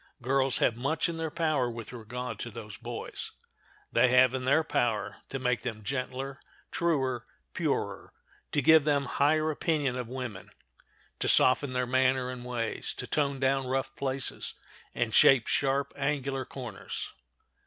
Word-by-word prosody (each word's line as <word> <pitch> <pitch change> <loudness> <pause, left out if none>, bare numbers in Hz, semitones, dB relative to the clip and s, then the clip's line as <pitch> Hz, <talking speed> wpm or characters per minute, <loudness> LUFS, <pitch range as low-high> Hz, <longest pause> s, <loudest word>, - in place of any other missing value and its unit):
Girls 135 +1 +2
have 115 - +2
much 140 +9 0
in 170 -1 -4
their 160 -1 -2
power 155 -6 +1
with 115 0 -7
regard 120 0 -6
to 120 - -4
those 110 -2 -8
boys; 120 0 -6 0.6
they - - +5
have 125 0 +5
in 130 -1 -2
their 140 +5 +4
power 115 -7 0
to 135 - -3
make 125 -2 0
them 110 -3 -5
gentler, 135 +3 -3 0.3
truer, 135 -8 0 0.3
purer; - - -2 0.4
to 145 - +2
give 160 +2 +7
them 145 -2 +2
higher 155 +3 +2
opinion 150 -4 0
of 125 -2 -4
woman; 120 -6 -6 0.7
to - - +1
soften 130 +1 +4
their 125 0 +1
manner 130 0 +2
and 125 -1 -7
ways; 120 -3 -3
to - - -4
tone 140 -2 0
down 135 0 +1
rough 135 +1 -1
places, 135 -1 -2 0.4
and 115 -2 0
shape 130 +1 +7
sharp, 140 0 +1
angular 135 -2 -1
corners. 130 -3 -6
130 Hz, 155 wpm, -29 LUFS, 125-140 Hz, 0.7 s, give